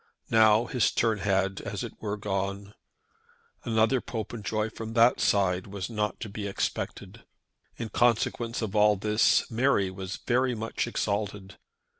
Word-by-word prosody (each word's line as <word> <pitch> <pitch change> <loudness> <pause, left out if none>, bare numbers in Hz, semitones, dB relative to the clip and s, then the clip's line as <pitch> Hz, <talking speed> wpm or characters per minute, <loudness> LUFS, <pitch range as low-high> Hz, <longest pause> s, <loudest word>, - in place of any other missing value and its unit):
Now 110 0 +5
his 125 -3 +1
turn 110 -2 +1
had, 95 -1 0
as - - -5
it - - -6
were, 105 -1 -3
gone. 100 0 -3 0.9
Another 115 +2 +2
Popenjoy 110 -1 -3
from 115 0 -7
that 120 +1 +5
side 95 -2 +1
was 100 +2 -5
not 105 -2 -2
to 115 - -4
be 100 0 -5
expected. 100 - -4 0.5
In 115 - -5
consequence 120 0 +1
of 110 -1 -4
all 105 0 +5
this 105 +4 +2
Mary 115 -5 +2
was 95 0 -6
very 125 0 +2
much 115 +1 -3
exalted. 100 -3 -3
105 Hz, 140 wpm, -28 LUFS, 100-115 Hz, 0.9 s, Now